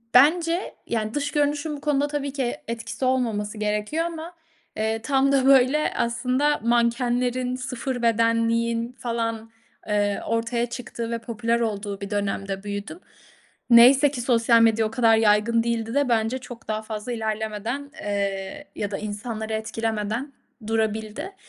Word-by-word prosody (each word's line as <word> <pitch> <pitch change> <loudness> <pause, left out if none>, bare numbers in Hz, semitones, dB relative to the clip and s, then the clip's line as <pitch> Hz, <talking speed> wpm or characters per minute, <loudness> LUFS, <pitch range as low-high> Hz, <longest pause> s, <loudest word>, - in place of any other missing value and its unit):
bence, 335 +6 +4
yani, 220 -2 -2
dış 290 0 -1
görünüşün 295 +1 0
bu - - -13
konuda 290 -1 +1
tabii 285 -2 -3
ki 260 -4 -2
etkisi 230 +3 -4
olmaması 225 -5 0
gerekiyor 210 +10 -1
ama, 335 +1 -6 0.4
eee, 220 +1 0
tam 275 +1 +2
da 270 -1 +3
böyle 270 +3 +4
aslında 255 +5 +1
mankenlerin, 245 +1 +1
0 255 -1 -4
bedenliğin 230 +1 +1
falan, 230 -1 -3 0.4
eee, 205 -1 +1
ortaya 230 +1 0
çıktığı 235 -1 -6
ve 230 - -2
popüler 230 0 -1
olduğu 205 -3 -3
bir 200 - -5
dönemde 195 -1 -2
büyüdüm. 205 - -5 0.7
Neyse 260 +4 +7
ki 250 -4 -4
sosyal 230 -2 +4
medya 225 -1 +4
o - - -9
kadar 225 -2 +4
yaygın 225 +2 +3
değildi 230 0 -2
de 285 -3 +2
bence 225 +2 +1
çok 245 -2 -11
daha 215 0 -2
fazla 215 +2 -5
ilerlemeden, 220 +5 -3
eee, 200 +6 -3
ya 205 -1 -3
da 195 - -2
insanları 220 +1 -5
etkilemeden 220 +4 -2 0.3
durabildi. 220 - -2
230 Hz, 140 wpm, -24 LUFS, 220-260 Hz, 0.7 s, Neyse